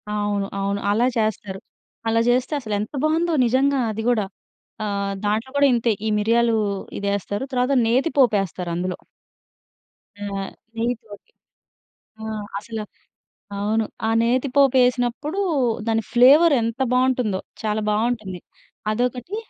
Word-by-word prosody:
అవును. 205 -1 -1
అవును. 200 +1 -1
అలా 225 +4 +2
చేస్తారు. 210 -3 -2 0.5
అలా 225 0 +2
చేస్తే 255 +4 +1
అసలెంత 210 -3 -3
బావుందో 325 +2 +1
నిజంగా. 270 +3 +2
అది 220 +1 -4
గూడా 220 -4 +2 0.6
ఆహ్, 200 -1 -2
దాంట్లో 215 +5 0
గూడా 285 0 +5
ఇంతే 235 0 +2 0.2
ఈ - - +1
మిరియాలు 230 +2 +2 0.4
ఇదేస్తారు. 200 +2 -2
తరువాత 250 +2 +1
నేతి 260 +8 +2
పోపేస్తారు 195 -7 +2
అందులో. 180 +1 -2 1.2
ఆ! - - -3 0.5
నెయ్యి 235 +2 0
తోటి 205 -2 -14 0.9
ఆ! - - -5 0.3
అసలు. 215 +1 -6 0.7
అవును. 215 +2 0 0.2
ఆ - - +1
నేతి 245 +4 +1
పోపేసినప్పుడు 260 +4 +2 0.5
దాని 225 0 +1
ఫ్లేవర్ 280 +7 +7
ఎంత 230 +3 -3
బావుంటుందో, 250 -6 +1 0.2
చాలా 215 0 -1
బావుంటుంది. 215 -4 -1 0.5
అదొకటి, 250 - -2
225 Hz, 115 wpm, -22 LUFS, 205-250 Hz, 1.2 s, ఫ్లేవర్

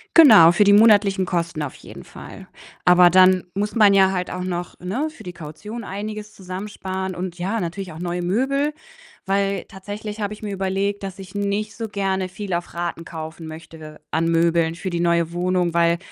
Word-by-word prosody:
Genau, 215 - +9
für 200 +4 +3
die 200 - +6
monatlichen 205 -3 +5
Kosten 170 -3 -2
auf 140 - -5
jeden - - -12
Fall. - - -11 0.4
Aber 180 0 +6
dann 185 0 +5
muss 205 +3 -2
man 210 -3 +6
ja 190 -1 +5
halt 180 -1 -2
auch 180 0 -4
noch 175 -1 -4
ne, 230 +13 -2
für 310 - -14
die 180 - -6
Kaution 200 +9 -8
einiges 210 +2 -6
zusammensparen 190 0 -5
und 180 0 -5
ja, 200 +4 -2
natürlich 175 0 -5
auch 160 - -10
neue 175 0 -3
Möbel, 270 +10 0 0.5
weil 195 -1 0
tatsächlich 210 +2 -8
habe 205 0 -2
ich 210 - -9
mir 205 -1 -4
überlegt, 195 +1 -2
dass 195 0 -6
ich 190 0 -11
nicht 205 +1 -2
so 225 -1 -4
gerne 190 -2 -1
viel 190 0 -5
auf 175 - -4
Raten 170 -1 -4
kaufen 160 -1 -8
möchte 155 -1 -11
an 165 +1 +1
Möbeln 165 0 +2
für 185 +1 -4
die 170 - -2
neue 170 -1 +1
Wohnung, 180 -1 0
weil 170 0 +3
185 Hz, 190 wpm, -22 LUFS, 175-205 Hz, 0.5 s, Genau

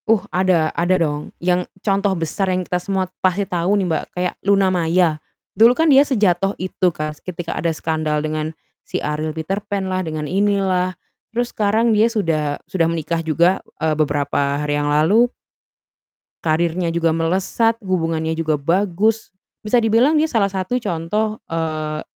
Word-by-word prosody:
Uh, 220 -4 +4
ada 180 -4 +2
ada 175 +2 +2
dong. 150 -3 -2
Yang 180 0 0 0.2
contoh 200 -1 +2
besar 175 +4 -1
yang 185 0 0
kita 180 0 -2
semua 190 0 -1 0.2
pasti 190 +2 +1
tahu 180 +3 0
nih 195 - +1
Mbak, 160 - 0
kayak 180 0 0
Luna 195 -1 +3
Maya. 165 -2 +1 0.3
Dulu 230 +3 +6
kan 320 -1 +4
dia 270 - +8
sejatuh 200 -8 +1
itu 185 0 0
kas, 155 -2 -5
ketika 175 -2 -5
ada 170 - -1
skandal 155 -1 -1
dengan 155 0 -2 0.4
si - - -2
Ariel 150 +1 -2
Peterpan 195 +4 -3
lah, 185 0 0
dengan 155 -3 -4
ini 200 +5 +1
lah. 185 -1 0 0.4
Terus 240 +1 -2
sekarang 220 +2 +2
dia 215 +2 +4
sudah 160 -10 -1
sudah 175 -2 0
menikah 165 0 -2
juga, 170 +3 +2 0.2
eee, 160 0 +1
beberapa 145 -1 0
hari 145 - -1
yang 145 0 -1
lalu 195 +12 +3 1.1
karirnya 170 +2 +1
juga 165 -1 +1
melesat, 190 +7 +1
hubungannya 165 -3 -1
juga 160 -2 0
bagus. 195 +8 0 0.3
Bisa 215 +3 +1
dibilang 235 +7 +3
dia 305 - +3
salah 225 -10 +1
satu 195 +6 -2
contoh, 210 +4 -2
eee, 155 -2 -3
180 Hz, 160 wpm, -20 LUFS, 160-200 Hz, 1.1 s, dia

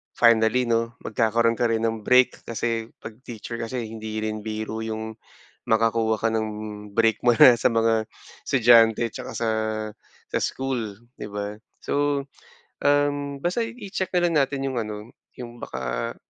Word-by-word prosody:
finally 115 +1 +4
no, 115 0 +1
magkakaroon 115 +1 +1
ka 120 - +3
rin 115 0 0
ng 110 -1 -3
break. 125 +2 +4
Kasi 115 0 -2
pag 110 - -9
teacher 115 0 -7
kasi 115 0 -4
hindi 110 -1 -5
rin 110 -1 -3
biro 110 0 -4
yung, 110 0 -5 0.5
makakuha 110 -1 +2
ka 115 - +2
ng 110 -1 -1 0.5
break 115 -1 +3
mo 120 - +6
na 120 +1 +8
sa - - +1
mga 115 -2 +2 0.4
estudyante 115 -2 +5
tsaka - - -8
sa 115 -1 -1 0.8
sa - - 0
school 125 -6 -2 0.2
di - - -6
ba? 105 0 -5 0.2
So 145 -1 0 0.6
um 145 0 +1
basta 180 +7 0
i 235 - -10 0.2
i-check 190 - -1
na 175 - +3
lang 165 -3 +3
natin 135 0 0
yung 130 -3 -1
ano 105 +1 -6 0.2
yung 120 -1 -9
baka, - - -4
115 Hz, 155 wpm, -24 LUFS, 110-125 Hz, 0.8 s, na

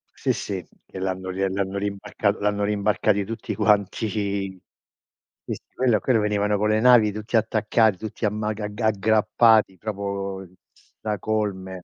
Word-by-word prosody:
Sì - - 0
sì, 95 -3 -4 0.2
che - - -9
l'hanno 95 0 -3
l'hanno 95 0 -1
l'hanno 95 +1 -5
rimb 100 0 -3 0.4
l'hanno 105 0 0
rimbarcati 105 0 +1
tutti 115 +2 -5
quanti. 105 +1 +2 1.4
Sì, - - -4
quello 120 -5 +2
quello 125 0 +2
venivano 105 0 +1
con 105 +1 +1
le 110 0 +3
navi 115 -3 +6
tutti 110 +3 -5
attaccati, 110 -1 +2
tutti 110 +4 -8
amma 105 +1 -1
agg 105 -1 -5
aggrappati 110 -1 +3
proprio 100 -2 -4 0.5
stracolme. 100 -3 -3
105 Hz, 130 wpm, -24 LUFS, 100-110 Hz, 1.4 s, navi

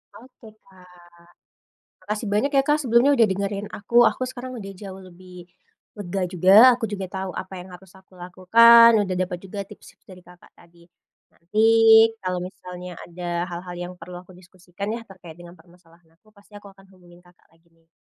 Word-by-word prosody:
Oke, 245 -1 -17 0.2
Kak. 180 -2 -21 1.0
Makasih 210 +3 -5
banyak 260 +7 0
ya, 270 - +4
Kak, 295 +1 +2
sebelumnya 245 +3 +3
udah 230 -4 +3
dengerin 200 +1 -4
aku. 215 +3 +1
Aku - - -9
sekarang 255 -1 -9
udah 195 -1 -9
jauh 190 0 -11
lebih 180 0 -15 0.5
lega 190 -1 -4
juga, 180 +1 +1 0.2
aku 240 -1 -4
juga 200 -2 -6
tau 190 -1 -5
apa 190 0 -7
yang 180 - -12
harus 180 0 -17
aku 190 0 -24
lakukan, 225 +7 +5 0.2
udah 185 -1 -4
dapet 180 -1 -3
juga 200 +1 -8
tips 210 - -16 0.2
dari 180 -1 -15
Kakak 180 0 -20
tadi. 170 0 -23 0.4
Nanti 180 +6 -5 0.6
kalo 185 -1 -4
misalnya 180 -1 -10
ada 175 0 -5
hal-hal 175 +1 -8
yang 175 +1 -7
perlu 175 +1 -10
aku 185 - -18
diskusikan 185 +2 -10
ya - - -8
terkait 180 -5 -15
dengan 175 0 -14
permasalahan 170 -1 -25
aku, 215 +5 -29
pasti 205 0 -25
aku 205 -1 -13
akan 195 0 -22
hubungin 175 -1 -20
Kakak 175 0 -26
lagi 165 +1 -31
nih. 165 0 -35
185 Hz, 175 wpm, -22 LUFS, 175-205 Hz, 1.0 s, lakukan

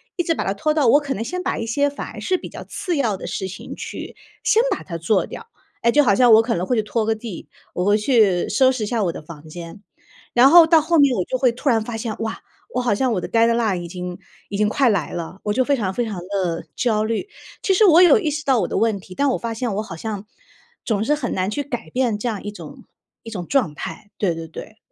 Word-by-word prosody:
一 350 - 0
直 330 - +1
把 - - -3
它 195 - 0
拖 305 +10 0
到 295 -6 +2
我 285 - +6
可 275 -2 -3
能 205 - -5
先 360 +11 -4
把 - - -1
一 225 - -3
些 285 +5 +1
反 285 - -7
而 - - -8
是 370 -1 +1
比 - - -8
较 - - -9
次 355 -4 -3
要 225 -9 0
的 - - -7
事 190 - -4
情 190 - -8
去， - - -7 0.3
先 455 +1 +4
把 - - -1
它 170 - -6
做 175 +3 +1
掉。 460 - -10 0.3
哎， 235 - +3
就 295 +4 +5
好 205 -8 +3
像 245 0 +5
我 220 - +8
可 230 +1 -1
能 175 +2 -2
会 250 - 0
去 220 - +3
拖 220 +1 -1
个 225 - +2
地， 220 -4 -8 0.2
我 180 - -1
会 205 +2 +3
去 210 -6 +3
收 260 -1 +4
拾 255 -4 -3
一 - - -5
下 230 -3 0
我 175 - 0
的 - - -8
房 155 0 -12
间。 170 +4 -9 0.5
然 250 +3 +7
后 340 +1 +9
到 325 0 +5
后 335 +2 +1
面 280 -3 +5
我 180 - +1
就 255 - -2
会 250 -2 +3
突 255 +5 -7
然 225 -3 +2
发 225 0 -5
现， 225 -1 -4
哇， 225 0 -3 0.4
我 250 - +1
好 235 -5 +1
像 255 +2 +1
我 185 - -1
的 - - -4
deadline 230 -5 +2
已 170 - -6
经 180 0 -6 0.3
已 200 - -5
经 210 0 +2
快 265 +3 +3
来 195 -8 0
了， 170 +2 -6
我 210 - -1
就 260 +4 +2
非 285 - +2
常 195 -7 -2
非 240 +4 -1
常 215 -3 -5
地 180 -3 -2
焦 220 -4 +1
虑。 225 - -2 0.3
其 - - 0
实 405 - +4
我 350 -2 +7
有 365 +7 +7
意 325 -8 -1
识 300 +1 -4
到 260 -5 +3
我 - - -1
的 - - -2
问 225 -2 +2
题， 185 - -12
但 280 +7 +1
我 - - 0
发 230 -1 -4
现 225 -2 -2
我 210 - -1
好 165 - -8
像， 210 +2 -5 0.6
总 215 -3 0
是 295 - +2
很 270 -5 -3
难 190 +2 -1
去 285 - -2
改 245 -4 -6
变 245 -4 0
这 210 - -4
样 210 -4 -4
一 205 - -5
种 210 - -11 0.4
一 230 - -8
种 185 -6 -5
状 230 - +1
态， 205 +7 -7
对 190 -5 +1
对 165 0 -7
对。 215 +6 -10
225 Hz, 315 characters per minute, -21 LUFS, 195-265 Hz, 0.6 s, 后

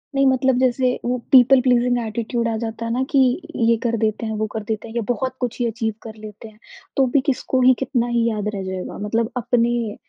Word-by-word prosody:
नहीं, 275 0 +3
मतलब 260 -1 +2
जैसे 255 0 +2 0.2
वो 250 +1 0
पीपल 260 0 +7
प्लीज़िंग 245 -1 +2
एटीट्यूड 230 +2 -2
आ 225 - -1
जाता 230 0 -5
है 230 - -3
ना 255 +2 0
कि 280 - +2 0.4
ये 230 0 +3
कर 230 -1 0
देते 220 +1 -1
हैं, 220 - -3
वो 215 0 -1
कर 220 - -4
देते 215 +1 -4
हैं 225 - -11
या 235 - 0
बहुत 260 +1 -1
कुछ 245 -1 -3
ही 245 - +1
अचीव 225 -1 -2
कर 220 -1 -9
लेते 215 0 -11
हैं, 215 0 -18 0.4
तो 270 - +4
भी 280 - +4
किसको 260 -2 0
ही, 255 +1 +6
कितना 250 -2 -1
ही 235 -1 +1
याद 210 -2 -3
रह 195 - -4
जाएगा? 190 -1 -5
मतलब 225 +2 0
अपने 235 -2 0
235 Hz, 230 wpm, -21 LUFS, 220-250 Hz, 0.4 s, पीपल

